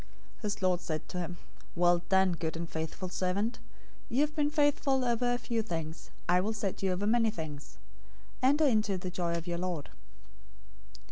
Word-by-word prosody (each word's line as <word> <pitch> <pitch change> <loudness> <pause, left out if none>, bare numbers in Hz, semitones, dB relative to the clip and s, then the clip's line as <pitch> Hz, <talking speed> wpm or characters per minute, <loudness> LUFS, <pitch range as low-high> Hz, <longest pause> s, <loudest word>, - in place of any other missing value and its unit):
025:021 - - -26
"His 210 -1 -2
lord 180 -1 +3
said 155 -2 -3
to 180 - -3
him, 175 0 -4 0.4
'Well 175 0 +4
done, 190 -1 +5
good 165 -1 -2
and 170 0 -3
faithful 160 +3 -4
servant. 195 +6 -1 0.5
You 255 +4 +2
have 300 0 +1
been 295 -2 +2
faithful 290 -3 +2
over 245 0 +2
a 245 - +2
few 235 -2 -1
things, 165 -6 -5 0.2
I 180 +1 +5
will 215 +4 0
set 200 -3 -3
you 190 -1 +2
over 185 +3 -1
many 225 +1 +4
things. 155 -8 -7 0.6
Enter 285 +4 +5
into 215 -7 +3
the 180 0 -4
joy 175 -2 -1
of 170 0 -3
your 175 -1 -2
lord.' 175 -5 -3
190 Hz, 185 wpm, -31 LUFS, 175-235 Hz, 0.6 s, done